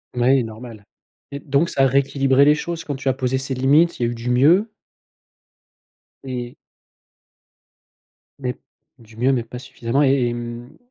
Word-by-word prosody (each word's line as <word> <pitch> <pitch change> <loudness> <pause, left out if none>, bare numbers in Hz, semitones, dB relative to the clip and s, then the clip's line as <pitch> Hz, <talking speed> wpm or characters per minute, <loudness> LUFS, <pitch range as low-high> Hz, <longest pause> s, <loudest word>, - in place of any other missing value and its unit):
Mouais 125 +2 +3
normal. 110 -1 -10 0.5
Et 140 - -5
donc 145 +3 0
ça 135 - +1
a 135 - +5
rééquilibré 135 0 +2
les 150 - +6
choses? 170 +2 -5
Quand 145 - -4
tu 135 +1 -7
as - - +2
posé 130 0 -1
ces 135 0 -4
limites, 145 +6 +3
il - - -1
y - - +3
a 120 - -2
eu - - -5
du 115 +1 -5
mieux? 160 - +4 1.5
Et. 125 -2 -6 1.8
Mais 125 -2 -4 0.4
du 115 -2 -18
mieux, 125 +3 +2
mais 125 -3 0
pas 125 +2 -9
suffisamment, 125 +2 -2
et 135 -3 +2
et - - -3
mmh, 120 +1 -8
130 Hz, 170 wpm, -21 LUFS, 120-140 Hz, 1.8 s, les